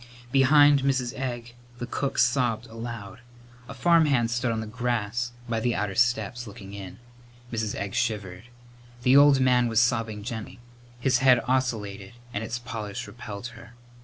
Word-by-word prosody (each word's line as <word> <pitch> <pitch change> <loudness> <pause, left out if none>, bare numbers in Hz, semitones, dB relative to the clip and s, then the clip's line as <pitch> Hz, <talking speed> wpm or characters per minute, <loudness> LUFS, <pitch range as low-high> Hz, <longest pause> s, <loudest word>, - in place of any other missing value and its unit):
Behind 145 +1 +6
Mrs. 130 -3 0
Egg 120 -3 -5 0.2
the 120 - -4
cook 140 +2 -3
sobbed 120 -2 +2
aloud. 115 -3 -8 0.5
A - - -7
farmhand 145 -6 +3
stood 120 0 0
on 110 - -2
the 110 - -4
grass 120 0 -2 0.2
by 115 -1 -1
the 120 +1 0
outer 100 0 -2
steps, 120 +1 0
looking 100 -1 -10
in. 95 -2 -8 0.6
Mrs. 110 -2 -2
Egg 100 -1 -4
shivered. 100 -2 -2 0.6
The 130 +2 +5
old 140 -1 +7
man 125 -2 +3
was 115 -1 +2
sobbing 115 -3 0
gently. 110 -2 -6 0.4
His 125 -1 +2
head 130 -2 +5
oscillated 110 -7 -2 0.2
and 105 - -2
its 115 +2 -3
polish 115 -5 -6
repelled 110 -1 -8
her. 115 +1 -14
120 Hz, 155 wpm, -26 LUFS, 110-125 Hz, 0.6 s, old